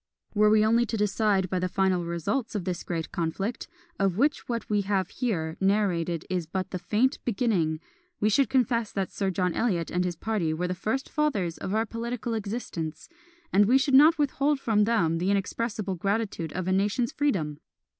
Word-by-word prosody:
Were 210 0 +4
we 215 0 +5
only 230 +2 +3
to 225 - -2
decide 205 -2 +1
by 185 0 -1
the 185 0 -1
final 185 -1 +1
results 170 - -2
of 200 - -1
this 180 -2 -2
great 165 -2 -4
conflict, 195 +5 -3 0.3
of 195 -2 +1
which 285 +3 +1
what 235 -1 -2
we 205 -1 +1
have 195 -2 0
here 165 -11 -2
narrated 180 -5 +1
is 180 -3 -2
but 185 +2 -3
the 185 - -3
faint 240 +9 +1
beginning, 195 -9 0 0.4
we 210 - +2
should 260 +6 +3
confess 235 -4 +1
that 195 -2 -2
Sir 195 -2 -1
John 180 -1 0
Eliot 180 -8 0
and 180 +1 +1
his 180 -1 -2
party 175 -4 -1
were 180 +3 -1
the 180 - -1
first 220 +8 -2
fathers 210 - -1
of 195 - -3
our 220 +1 +2
political 235 +1 -4
existence; 200 -8 -4 0.4
and 205 +2 +6
we 255 +4 +5
should 270 +1 0
not 305 +5 +7
withhold 290 0 +1
from 210 -5 +2
them 170 -8 +1
the 180 +3 0
inexpressible 200 +1 -1
gratitude 195 -3 -2
of 185 0 -3
a - - +1
nation's 205 +5 +1
freedom! 170 - -1
200 Hz, 190 wpm, -27 LUFS, 180-230 Hz, 0.4 s, not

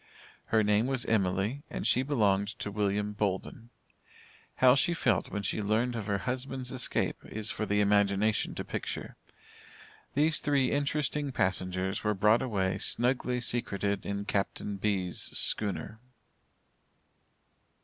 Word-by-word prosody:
Her 110 -1 +3
name 105 +3 +2
was 130 -2 0
Emily, 100 +4 0
and - - -5
she 125 - +4
belonged 105 -8 +2
to 105 - -4
William 105 0 -1
Bolden. 105 +3 -3 0.9
How 130 -1 +6
she 170 +5 +2
felt - - +1
when 100 +1 -4
she 105 - -1
learned 110 +4 +1
of 110 -3 -4
her 100 -1 +1
husband's 130 +2 -3
escape 130 -2 -1
is 110 0 -2
for 110 - -3
the 105 0 +2
imagination 100 +1 +2
to - - -4
picture. - - -5 1.0
These 155 +2 +3
three 140 -3 +1
interesting 145 0 0
passengers 95 -3 -1
were 105 -1 +1
brought 105 +4 +4
away 95 -6 -1
snugly 125 0 +1
secreted 100 -5 -1
in 100 0 -3
Captain 100 0 -2
B's. 95 -3 -1
schooner. 105 +1 -1
105 Hz, 130 wpm, -30 LUFS, 100-125 Hz, 1.0 s, How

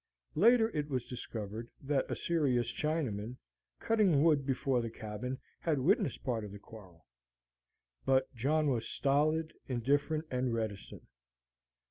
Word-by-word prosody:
Later 225 +4 +5
it 150 0 -1
was 130 -3 -1
discovered 115 -2 -6
that 140 -1 0
a - - -1
serious 130 -8 +1
Chinaman, 125 -8 -2 0.4
cutting 200 -10 +3
wood 150 -4 +3
before 135 -1 +1
the 115 - -3
cabin, 110 +4 -5 0.2
had 160 -3 0
witnessed 135 - +1
part 120 -4 -1
of 105 - -7
the 100 - -8
quarrel. 95 -6 -14 1.0
But 130 0 +2
John 145 +5 +2
was 115 -3 -1
stolid, 155 +3 +1
indifferent, 145 +5 +1
and 125 -2 0
reticent. 110 -3 -5
130 Hz, 130 wpm, -33 LUFS, 115-155 Hz, 1.0 s, Later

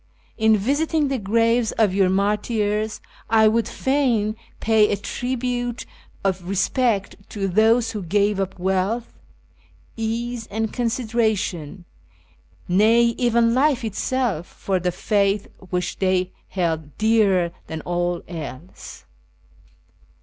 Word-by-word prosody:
In 220 -1 +4
visiting 290 +7 +1
the 270 -2 -1
graves 230 +3 +2
of 210 -4 +2
your 190 -1 +3
martyrs 210 +2 0 0.3
I 220 -1 +5
would 225 +1 +2
fain 245 -6 0 0.2
pay 220 -1 +3
a - - +2
tribute 245 +2 -3 0.4
of 185 -2 -1
respect 205 +1 0
to 195 -2 -2
those 225 +4 +3
who 210 - -4
gave 200 +3 +1
up 195 -1 -3
wealth, 190 +5 -1 0.8
ease, 230 +1 -3
and 220 +1 -3
consideration, 220 - -1 0.8
nay, 225 +5 +4
even 235 -1 +3
life 270 -1 +2
itself, 220 -4 -1
for 190 -2 -2
the 180 0 -1
faith 200 +1 +1 0.2
which 180 -1 -2
they 185 -1 +1 0.2
held 160 -5 -2
dearer 205 -6 +3 0.2
than 160 0 -5
all 175 +1 -2
else." 160 0 -9
215 Hz, 115 wpm, -22 LUFS, 190-235 Hz, 0.8 s, I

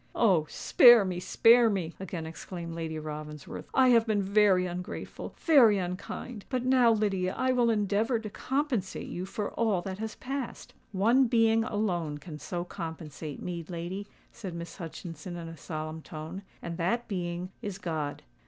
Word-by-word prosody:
"Oh! 180 -9 +3
spare 240 -5 +7
me—spare 225 +6 +4
me!" 180 -5 -2
again 180 -3 -5
exclaimed 170 +1 -7
Lady 165 -1 -4
Ravensworth. 150 -1 -7
"I 260 -1 +5
have 230 -2 +5
been 210 -2 +1
very 195 -2 +4
ungrateful—very 210 - +2
unkind; 195 +4 -5
but 255 -2 -1
now, 255 -2 +5
Lydia, 195 -4 0
I 260 0 +2
will 245 -2 +3
endeavour 215 +2 +1
to 220 -1 -6
compensate 265 -8 -2
you 180 +2 -4
for 205 +1 -3
all 210 -6 +1
that 190 0 -5
has 220 -1 -4
passed." 265 -1 -5 0.2
"One 230 +7 +4
being 225 -1 +4
alone 180 -9 -1
can 150 0 -9
so 175 +2 -4
compensate 160 -4 -7
me, 175 -2 -4
lady," 180 +4 -5 0.2
said 195 -7 -7
Miss 170 -1 -7
Hutchinson 170 0 -7
in 170 -1 -6
a 165 - -8
solemn 155 0 -5
tone; 160 +5 -7 0.2
"and 170 -1 -5
that 235 +8 0
being 180 -2 -3
is 205 -4 -4
God! 160 -6 -3
190 Hz, 155 wpm, -29 LUFS, 170-225 Hz, 0.2 s, spare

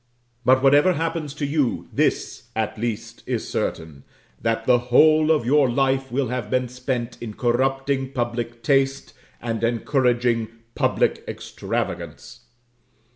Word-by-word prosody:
But 130 +2 +4
whatever 145 +6 +5
happens 165 -2 -2
to 150 - -2
you, 140 -3 0
this, - - -1
at 110 -1 -1
least, 115 0 -4
is - - -2
certain, 75 -4 -4 0.4
that 115 0 -1
the 125 -1 +5
whole 155 +4 +5
of 155 -7 +3
your 140 +1 +4
life 135 +1 +1
will 130 -1 0
have 125 -4 -3
been 125 0 0
spent 125 -1 -4
in 110 -3 -6
corrupting 135 +2 0
public 120 -2 -3
taste 135 -1 +1 0.3
and 115 -1 -3
encouraging 120 -1 +1 0.3
public - - +1
extravagance. - - -5
125 Hz, 130 wpm, -23 LUFS, 120-135 Hz, 0.4 s, whatever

